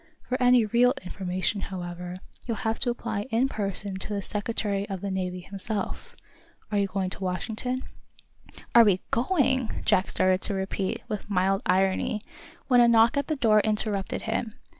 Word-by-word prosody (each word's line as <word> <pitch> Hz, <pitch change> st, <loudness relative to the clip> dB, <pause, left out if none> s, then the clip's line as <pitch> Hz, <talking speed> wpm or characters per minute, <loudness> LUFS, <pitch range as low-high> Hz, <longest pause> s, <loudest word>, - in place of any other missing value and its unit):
For 255 Hz, +1 st, -3 dB
any 245 Hz, -2 st, +5 dB
real 240 Hz, +4 st, +3 dB
information, 185 Hz, +2 st, -2 dB
however, 180 Hz, -1 st, -6 dB, 0.3 s
you'll 230 Hz, -3 st, -1 dB
have 220 Hz, 0 st, 0 dB
to -, -, 0 dB
apply 230 Hz, -2 st, -3 dB
in 240 Hz, +3 st, +2 dB
person 200 Hz, -4 st, -2 dB
to 190 Hz, -, -7 dB
the 200 Hz, -1 st, -2 dB
Secretary 205 Hz, -1 st, -2 dB
of 190 Hz, -2 st, -4 dB
the 200 Hz, -, -3 dB
Navy 180 Hz, -1 st, -3 dB
himself. 200 Hz, +2 st, -4 dB, 0.6 s
Are 205 Hz, -, +2 dB
you 200 Hz, -, +2 dB
going 190 Hz, -1 st, -2 dB
to 195 Hz, -, -4 dB
Washington?" 220 Hz, +7 st, -2 dB, 0.9 s
"Are 235 Hz, -, +9 dB
we 195 Hz, -4 st, +3 dB
going 260 Hz, -2 st, +2 dB
" -, -, -15 dB
Jack 185 Hz, -, +3 dB
started 185 Hz, 0 st, +2 dB
to 200 Hz, -, 0 dB
repeat, 190 Hz, 0 st, -2 dB
with 210 Hz, -2 st, -5 dB
mild 195 Hz, 0 st, +2 dB
irony, 190 Hz, +3 st, +2 dB, 0.5 s
when 245 Hz, -2 st, +6 dB
a 240 Hz, -, +6 dB
knock 230 Hz, +1 st, +5 dB
at 280 Hz, -1 st, 0 dB
the 310 Hz, -, 0 dB
door 220 Hz, -6 st, +4 dB
interrupted 210 Hz, -2 st, -1 dB
him. 225 Hz, 0 st, -2 dB
205 Hz, 170 wpm, -27 LUFS, 190-230 Hz, 0.9 s, Are